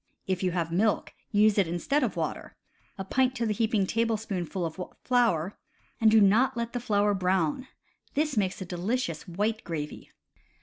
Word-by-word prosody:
If 185 Hz, -1 st, -1 dB
you 185 Hz, -, +1 dB
have 170 Hz, -2 st, -2 dB
milk, 205 Hz, +5 st, +1 dB, 0.2 s
use 210 Hz, 0 st, +4 dB
it 190 Hz, -, +3 dB
instead 175 Hz, -, 0 dB
of -, -, -1 dB
water -, -, -4 dB, 0.4 s
(a 195 Hz, -, -5 dB
pint 260 Hz, +4 st, +1 dB
to 235 Hz, -1 st, -1 dB
the 215 Hz, -, +1 dB
heaping 215 Hz, -2 st, +1 dB
tablespoonful 210 Hz, -5 st, -1 dB
of 165 Hz, +3 st, -5 dB, 0.2 s
flour), 220 Hz, -8 st, +1 dB, 0.4 s
and 225 Hz, -, +5 dB
do 220 Hz, 0 st, +6 dB
not 215 Hz, +6 st, +4 dB
let 235 Hz, 0 st, -3 dB
the 245 Hz, -, -1 dB
flour 205 Hz, -3 st, +2 dB
brown; 185 Hz, -, 0 dB, 0.5 s
this 300 Hz, -1 st, +1 dB
makes 195 Hz, -4 st, 0 dB
a -, -, -9 dB
delicious 180 Hz, 0 st, -2 dB
white 210 Hz, +5 st, -1 dB
gravy. 150 Hz, -3 st, -5 dB
205 Hz, 170 wpm, -28 LUFS, 180-230 Hz, 0.5 s, do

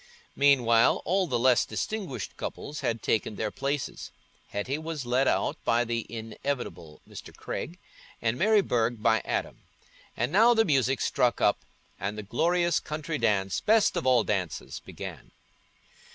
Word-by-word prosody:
Meanwhile, 125 Hz, -5 st, +4 dB
all 185 Hz, +2 st, +1 dB
the 125 Hz, -5 st, 0 dB
less 125 Hz, 0 st, +4 dB
distinguished 185 Hz, -, -4 dB
couples 150 Hz, +1 st, -6 dB
had 115 Hz, -1 st, -2 dB
taken 110 Hz, -1 st, 0 dB
their 110 Hz, 0 st, -2 dB
places: 140 Hz, 0 st, -3 dB, 0.4 s
Hetty 130 Hz, +9 st, -3 dB
was 160 Hz, -4 st, -5 dB
led 125 Hz, +2 st, +2 dB
out -, -, 0 dB
by 120 Hz, +1 st, +2 dB
the 115 Hz, -1 st, -3 dB
inevitable 110 Hz, -, -5 dB
Mr. -, -, -10 dB
Craig, 175 Hz, -, -5 dB, 0.4 s
and 115 Hz, 0 st, 0 dB
Mary 210 Hz, -, +4 dB
Burge 120 Hz, -, 0 dB
by 110 Hz, -1 st, +3 dB
Adam; -, -, -3 dB, 0.6 s
and 120 Hz, +4 st, 0 dB
now 225 Hz, +6 st, +6 dB
the 225 Hz, 0 st, +4 dB
music 135 Hz, -4 st, +2 dB
struck 125 Hz, -1 st, +1 dB
up, 105 Hz, -, +3 dB, 0.4 s
and 100 Hz, +2 st, -3 dB
the 105 Hz, -, -5 dB
glorious 170 Hz, -, +1 dB
country 155 Hz, +1 st, -4 dB
dance, 100 Hz, -4 st, +1 dB
best 220 Hz, 0 st, +3 dB
of 130 Hz, -, -1 dB
all 125 Hz, -3 st, +5 dB
dances, 95 Hz, -7 st, -3 dB
began. -, -, -9 dB
125 Hz, 150 wpm, -28 LUFS, 115-155 Hz, 0.6 s, now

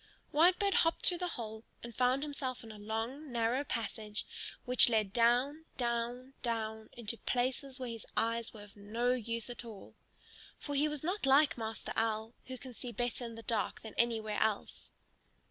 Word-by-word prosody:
Whitebird 360 Hz, +5 st, +5 dB
hopped 330 Hz, -1 st, +3 dB
through 350 Hz, -2 st, +3 dB
the 360 Hz, -, 0 dB
hole 220 Hz, -1 st, -6 dB, 0.2 s
and 235 Hz, -1 st, -8 dB
found 255 Hz, +2 st, +3 dB
himself 265 Hz, -4 st, -3 dB
in 225 Hz, -, -9 dB
a 215 Hz, -, -10 dB
long, 225 Hz, +7 st, -3 dB
narrow 240 Hz, +3 st, +1 dB
passage 215 Hz, -4 st, -3 dB, 0.4 s
which 250 Hz, -1 st, +8 dB
led 215 Hz, -4 st, +2 dB
down, 250 Hz, +7 st, +3 dB
down, 240 Hz, +2 st, -1 dB
down 220 Hz, -2 st, -2 dB
into 230 Hz, -1 st, -4 dB
places 255 Hz, +2 st, -1 dB
where 255 Hz, -2 st, -4 dB
his 230 Hz, -1 st, -8 dB
eyes 230 Hz, 0 st, +1 dB
were 210 Hz, -2 st, -10 dB
of 205 Hz, -1 st, -15 dB
no 225 Hz, +4 st, 0 dB
use 230 Hz, -2 st, -1 dB
at 245 Hz, 0 st, -5 dB
all. 220 Hz, -4 st, -10 dB, 0.6 s
For 290 Hz, -, -5 dB
he 285 Hz, +2 st, +4 dB
was 300 Hz, -1 st, -3 dB
not 365 Hz, -1 st, 0 dB
like 280 Hz, +2 st, +6 dB
Master 225 Hz, -1 st, -4 dB
Owl, 220 Hz, 0 st, 0 dB
who 260 Hz, 0 st, -5 dB
can 255 Hz, 0 st, -9 dB
see 245 Hz, +1 st, -5 dB
better 245 Hz, +2 st, -2 dB
in 230 Hz, -1 st, -5 dB
the 225 Hz, -, -9 dB
dark 220 Hz, -5 st, -1 dB
than 220 Hz, -, -8 dB
anywhere 220 Hz, -3 st, +1 dB
else. 220 Hz, -2 st, -1 dB
235 Hz, 180 wpm, -34 LUFS, 220-260 Hz, 0.6 s, which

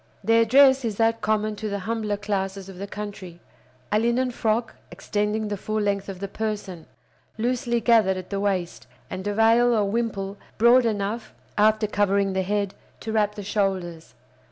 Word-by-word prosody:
Their 230 Hz, 0 st, +4 dB
dress 265 Hz, +2 st, +6 dB
is 220 Hz, -3 st, -2 dB
that 225 Hz, 0 st, +2 dB
common 215 Hz, 0 st, 0 dB
to 215 Hz, -, -4 dB
the 200 Hz, -, -2 dB
humbler 220 Hz, -2 st, -1 dB
classes 195 Hz, -2 st, -3 dB
of 190 Hz, -2 st, -11 dB
the 200 Hz, -, -5 dB
country—a 185 Hz, -6 st, -6 dB
linen 240 Hz, +3 st, +1 dB
frock 225 Hz, 0 st, -1 dB, 0.2 s
extending 210 Hz, +1 st, -2 dB
the 205 Hz, -1 st, -3 dB
full 215 Hz, +3 st, -2 dB
length 200 Hz, -1 st, -1 dB
of 190 Hz, -2 st, -7 dB
the 200 Hz, -, -4 dB
person, 205 Hz, -5 st, -5 dB, 0.5 s
loosely 240 Hz, +1 st, 0 dB
gathered 220 Hz, -5 st, +4 dB
at 185 Hz, +1 st, -8 dB
the 200 Hz, -, -1 dB
waist, 190 Hz, -4 st, -2 dB, 0.2 s
and 185 Hz, +2 st, -5 dB
a 205 Hz, -, 0 dB
veil 230 Hz, +2 st, +4 dB
or 210 Hz, -2 st, +2 dB
wimple 200 Hz, -2 st, -2 dB, 0.2 s
broad 240 Hz, +2 st, +5 dB
enough, 215 Hz, +1 st, -3 dB, 0.2 s
after 215 Hz, +1 st, +3 dB
covering 200 Hz, -1 st, +1 dB
the 190 Hz, -, 0 dB
head, 200 Hz, +1 st, -1 dB, 0.3 s
to 220 Hz, -, -4 dB
wrap 210 Hz, -1 st, +1 dB
the 205 Hz, -, -6 dB
shoulders. 190 Hz, -5 st, -2 dB
210 Hz, 170 wpm, -24 LUFS, 195-225 Hz, 0.5 s, dress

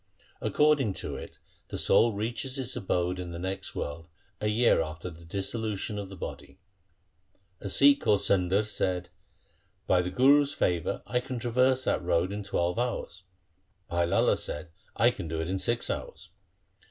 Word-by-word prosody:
According 150 Hz, -8 st, +3 dB
to -, -, -5 dB
it -, -, -9 dB, 0.3 s
the -, -, -5 dB
soul 115 Hz, -1 st, +4 dB
reaches 120 Hz, +6 st, -3 dB
its 130 Hz, -2 st, -2 dB
abode 90 Hz, -5 st, -1 dB
in 90 Hz, -1 st, -5 dB
the 85 Hz, -, -6 dB
next 95 Hz, +2 st, -5 dB
world 80 Hz, +3 st, -5 dB, 0.3 s
a 105 Hz, -, -1 dB
year 110 Hz, -3 st, +4 dB
after 80 Hz, +3 st, -5 dB
the 80 Hz, +1 st, -14 dB
dissolu 100 Hz, +5 st, -3 dB
tion 105 Hz, +2 st, -4 dB
of 100 Hz, -2 st, -6 dB
the 95 Hz, -, -9 dB
body. 70 Hz, -5 st, -8 dB, 1.0 s
A 100 Hz, -, -5 dB
Sikh 140 Hz, +7 st, +6 dB
called 105 Hz, -2 st, +3 dB
Sundar 95 Hz, +2 st, +2 dB
said, 90 Hz, -4 st, -1 dB, 0.4 s
' -, -, -37 dB, 0.3 s
By 90 Hz, -1 st, +3 dB
the 90 Hz, -, -3 dB
Guru's 140 Hz, +8 st, +4 dB
favour 85 Hz, -3 st, 0 dB
I 125 Hz, -, 0 dB
can 125 Hz, 0 st, -5 dB
traverse 125 Hz, +2 st, +2 dB
that -, -, +1 dB
road 90 Hz, +1 st, +1 dB
in 105 Hz, +1 st, -4 dB
twelve 90 Hz, 0 st, -1 dB
hours.' 120 Hz, -5 st, -3 dB, 0.7 s
Bhai 85 Hz, 0 st, +2 dB
Lala -, -, +3 dB
said, 75 Hz, +2 st, -4 dB
' -, -, -35 dB
I 120 Hz, +3 st, +4 dB
can 95 Hz, -8 st, -7 dB
do 80 Hz, 0 st, -3 dB
it 80 Hz, -, -2 dB
in 95 Hz, +1 st, -1 dB
six 115 Hz, +6 st, 0 dB
hours.' -, -, -6 dB
100 Hz, 175 wpm, -28 LUFS, 90-120 Hz, 1.0 s, Sikh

